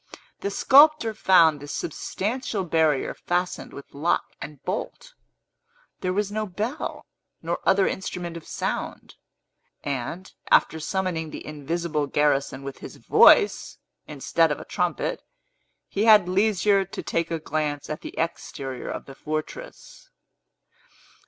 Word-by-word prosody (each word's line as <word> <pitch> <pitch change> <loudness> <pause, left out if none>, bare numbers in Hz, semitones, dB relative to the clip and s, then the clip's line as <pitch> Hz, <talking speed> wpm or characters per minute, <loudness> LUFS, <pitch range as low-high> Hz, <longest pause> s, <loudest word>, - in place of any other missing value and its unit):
The 200 - -2
sculptor 280 +2 +5
found 170 -7 +5
this 145 +1 -6
substantial 210 - -3
barrier 160 -5 +1
fastened 180 +1 -2
with 140 - -12
lock 150 +5 0
and 150 -2 -8
bolt. - - -5 0.9
There 185 - -1
was 200 +1 -1
no 215 0 -2
bell, 215 - -4 0.4
nor - - -2
other 195 0 +4
instrument 180 -2 -4
of 165 - -9
sound; - - -4 0.7
and, 145 +7 -4 0.2
after 160 - +4
summoning 165 -1 -2
the - - -8
invisible 150 0 -2
garrison 140 -2 +1
with 140 0 -7
his - - -9
voice, 420 - +5 0.3
instead - - +1
of - - -2
a - - -9
trumpet, - - -2 0.7
he 205 +2 -1
had 210 -5 +7
leisure 200 +1 +2
to 190 - -8
take 165 0 -1
a 165 - -1
glance 150 -2 -3
at 155 - -5
the - - -9
exterior 135 -5 -4
of - - -5
the 135 - -11
fortress. 155 - -7
175 Hz, 130 wpm, -25 LUFS, 150-200 Hz, 0.9 s, had